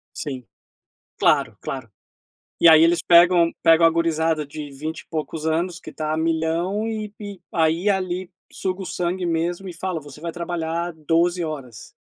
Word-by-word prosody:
Sim. 135 -5 -5 0.8
Claro, - - +2
claro. 130 -5 -6 0.7
E - - +7
aí 160 0 +8
eles 170 +1 +4
pegam 170 -1 +6
pegam 165 0 +6
a 165 - +7
gurizada 160 -2 0
de 145 0 -8
20 155 +4 -5
e - - -25
poucos 155 0 -4
anos 170 +2 -1
que 155 - -10
tá 155 +1 -3
a - - -1
milhão 165 +6 0
e 215 -2 -4
e 205 -3 -8
aí, 165 +4 +2
ali, 185 -1 -1 0.2
suga 185 0 -3
o - - -5
sangue 180 +1 -2
mesmo 170 +3 -1
e 180 - -6
fala: 180 0 -3
"Você 145 0 -13
vai 170 0 -4
trabalhar 170 0 -3
12 165 +3 +1
horas". 135 -8 -7
165 Hz, 170 wpm, -22 LUFS, 155-175 Hz, 0.8 s, aí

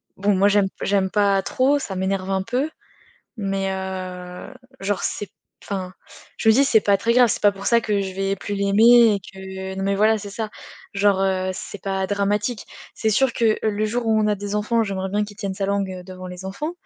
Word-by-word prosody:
Bon, 200 +1 +1
moi 195 +2 +4
j'aime 205 -1 +3 0.2
j'aime 195 -1 +1
pas 200 -1 +3
trop, 270 +8 +2
ça 200 -8 -5
m'énerve 190 0 -2
un 190 -1 0
peu. 250 +8 -1 0.7
Mais, 195 -2 -1
heu, 185 +1 -6 0.3
genre 195 0 -1
c'est 205 - -3
p - - -40 0.3
enfin, 185 -2 -4 0.4
je 220 - +3
me - - +7
dis: 275 +2 +5
«C'est 230 -5 +5
pas 200 -1 +3
très 230 +4 +1
grave, 245 -1 +5
c'est - - -1
pas 205 - +5
pour 200 0 -6
ça 235 0 +4
que 210 -2 0
je 190 -1 -4
vais 195 0 -1
plus 205 +1 -5
l'aimer 220 +3 +6
et - - -3
que» 190 0 -8
non 195 - -3
mais 200 0 +1
voilà, 215 +2 +3
c'est 205 -1 -8
ça. 220 +1 -4 0.5
Genre, 200 -1 +3
heu, 185 -1 0
c'est 195 - -7
pas 195 -1 -1
dramatique. 205 +3 -1 0.3
C'est 220 - 0
sûr 265 +4 +3
que, 225 -2 +2
heu, 220 - +3
le 210 +1 -1
jour 230 +2 -2
où 220 -1 +3
on 215 - +2
a 210 - +3
des 205 +1 -4
enfants, 220 +2 +1
j'aimerais 190 -2 -3
bien 210 +1 +1
qu'il 205 -1 -10
tienne 200 -3 -3
sa 195 +1 -2
langue, 200 -1 0
heu, - - -11
devant 185 0 -9
les 180 +1 -8
enfants. 245 - -4
200 Hz, 230 wpm, -22 LUFS, 190-215 Hz, 0.7 s, me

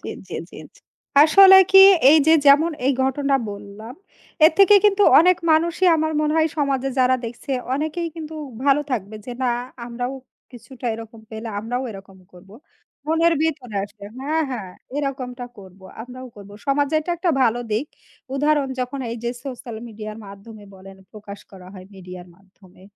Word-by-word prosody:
জি, - - -9 0.2
জি, - - -8 0.2
জি, - - -11 0.2
জি। - - -21 0.4
আসলে 385 +5 +7
কি 385 - +7 0.3
এই 310 - +6
যে 320 - +5
যেমন 295 +4 +5 0.2
এই 275 - +3
ঘটনা 275 +1 0
বললাম, 205 +3 -10 0.5
এর 315 - +6
থেকে 395 +1 +7
কিন্তু 410 0 +3 0.2
অনেক 360 +3 +4
মানুষই 335 +3 +2
আমার 315 0 -1
মনে 300 0 0
হয় 320 0 +2
সমাজে 270 -2 -1
যারা 255 0 +3
দেখছে 235 +4 -8 0.2
অনেকেই 315 +4 -3
কিন্তু 315 -1 -8 0.3
ভালো 280 0 +3
থাকবে। 215 -4 -4
যে 250 - -6
না 250 - +1 0.4
আমরাও 245 +2 -5 0.4
কিছুটা 250 +1 -11
এরকম 225 0 -11
পেলে 220 +1 -7
আমরাও 240 +4 -4
এরকম 195 -2 -13
করব। 180 +2 -17 0.6
মনের 330 +1 +2
ভিতর 280 -7 -3
আসে 200 0 -11
হ্যাঁ, 300 +4 -2
হ্যাঁ 210 -8 -6 0.3
এরকমটা 260 -3 -4
করব, 190 -1 -15 0.2
আমরাও 255 +2 -10
করব। 200 -1 -13 0.2
সমাজের 285 +2 +1
এটা 315 - -6
একটা 345 +1 0
ভালো 235 -1 +1
দিক। 225 +8 -1 0.5
উদাহরণ 290 0 +1
যখন 255 +2 -4
এই 230 - -5
যে 235 - -1
social 245 -4 -8
media-র 215 -1 -9
মাধ্যমে 205 +2 -13
বলেন 190 0 -14 0.2
প্রকাশ 205 -1 -11
করা 185 -2 -14
হয় 185 -2 -12
media-র 180 -1 -11
মাধ্যমে, 190 -1 -23
255 Hz, 165 wpm, -21 LUFS, 210-305 Hz, 0.6 s, আসলে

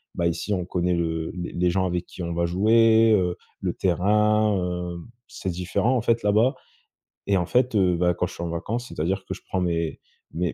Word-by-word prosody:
bah 85 - +1
ici 85 +5 -2
on 90 -2 -1
connaît 90 0 0
le 80 -1 -2
les 90 -1 -5
les 90 0 +1
gens 95 +1 +1
avec 90 -1 -2
qui 90 - -8
on 85 0 -3
va 85 0 0
jouer, 110 +5 +4
heu, 90 -4 +2 0.3
le - - -1
terrain, 105 +3 +2
heu, 90 -1 -3 0.3
c'est 95 - -5
différent 90 +8 0
en - - 0
fait 115 0 +1
là-bas 110 +6 +3 0.7
et 100 - +3
en 90 - 0
fait, 125 0 +2
heu, 90 -4 +3
bah 90 0 +2
quand 90 +1 -1
je - - -11
suis 85 - -6
en 85 - -3
vacances, 115 +9 -3
c'est-à-dire 95 +5 -2
que - - -4
je - - -11
prends 95 - -1
mes 85 -2 -1 0.3
mes 85 -1 -1
90 Hz, 215 wpm, -24 LUFS, 85-105 Hz, 0.7 s, jouer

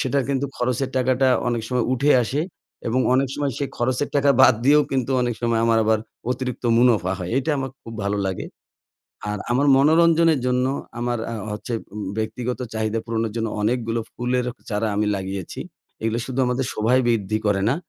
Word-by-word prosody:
সেটার 135 +1 +1
কিন্তু 140 0 0
খরচের 125 +2 -1
টাকাটা 130 +1 +2 0.2
অনেক 120 -2 -1
সময় 125 -2 0
উঠে 140 +3 +2
আসে 135 +6 -1 0.5
এবং 125 +3 +1
অনেক 135 0 +2
সময় 140 -2 -1
সেই 140 - -2
খরচের 125 +4 0
টাকা 140 0 +4
বাদ 130 -2 +7
দিয়েও 150 +2 +6
কিন্তু 130 0 0
অনেক 120 -1 0
সময় 115 -1 +1
আমার 115 -1 +3
আবার 110 0 +3 0.3
অতিরিক্ত 125 -1 -3
মুনাফা 110 -7 +3
হয়। 90 -1 -5
এইটা 135 +4 0
আমাক 135 -1 -3
খুব 115 - -9
ভালো 100 0 0
লাগে। 95 - -4 0.8
আর 105 - -3
আমার 135 +4 +2
মনোরঞ্জনের 165 +1 +4
জন্য 125 0 +2 0.3
আমার 120 0 -1
আ - - -3 0.2
হচ্ছে 105 +3 -6 0.2
উম 105 - -5 0.2
ব্যক্তিগত 120 +3 -3 0.2
চাহিদা 110 +1 -1
পূরণের 115 -2 -2
জন্য 115 -1 -1
অনেকগুলো 115 0 0
ফুলের 125 +1 -1 0.2
চারা 105 +1 0
আমি 105 0 +1
লাগিয়েছি। 95 -1 -5 0.4
এগুলো 115 +1 0
শুধু 130 0 -5
আমাদের 125 +1 0
শোভায় 120 +4 +2
বৃদ্ধি 110 -2 +1
করে 100 -1 +2
না, 130 - +2
120 Hz, 180 wpm, -22 LUFS, 110-130 Hz, 0.8 s, বাদ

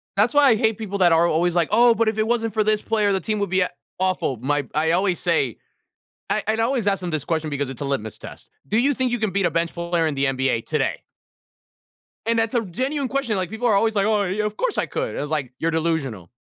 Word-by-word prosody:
That's 215 +6 +3
why 290 -2 +6
I 225 - +5
hate 220 -1 +1
people 200 -3 -4
that 175 -2 +5
are 165 +1 +4
always 170 +2 +1
like, 170 -3 +2
"Oh, 235 +1 +5
but 230 -1 +1
if 220 - 0
it 215 0 +1
wasn't 225 -2 0
for 215 -1 +2
this 215 0 +2
player, 210 -2 +1
the 190 - +1
team 215 0 -2
would 200 -2 -1
be 185 0 +2
a 180 - +1 0.3
awful." 185 -9 0
My 145 +4 -1
I 160 +1 +2
always 180 +1 +1
say 160 - 0 0.7
I - - 0
I'd 220 +1 +1
always 230 -2 0
ask 195 -1 +1
them 180 - -3
this 155 -3 -2
question 160 -2 -1
because 145 -2 -2
it's 135 +1 -8
a - - -2
litmus 120 -6 -3
test, - - -11 0.2
"Do 215 - 0
you 275 +5 +3
think 255 -2 -1
you 245 - -1
can 215 -3 -1
beat 195 0 +1
a - - +1
bench 165 0 0
player 170 -1 -1
in 150 - -2
the 135 +1 +1
NBA 130 -3 0
today?" - - -1 1.2
And 230 0 +2
that's 225 +2 0
a 235 - +2
genuine 260 - -2
question, 270 -6 -1
like, 185 -2 -2
people 220 +3 -2
are 215 - +4
always, 220 +2 +2
like, 200 - +2
"Oh, 215 -2 +2
yeah. 200 +3 -1
Of 210 - -3
course - - -1
I - - +1
could." - - -4
It - - -4
was, 145 +1 -4
like, 145 -5 -2
"You're 165 0 0
delusional. 155 - -2
195 Hz, 265 wpm, -22 LUFS, 160-225 Hz, 1.2 s, why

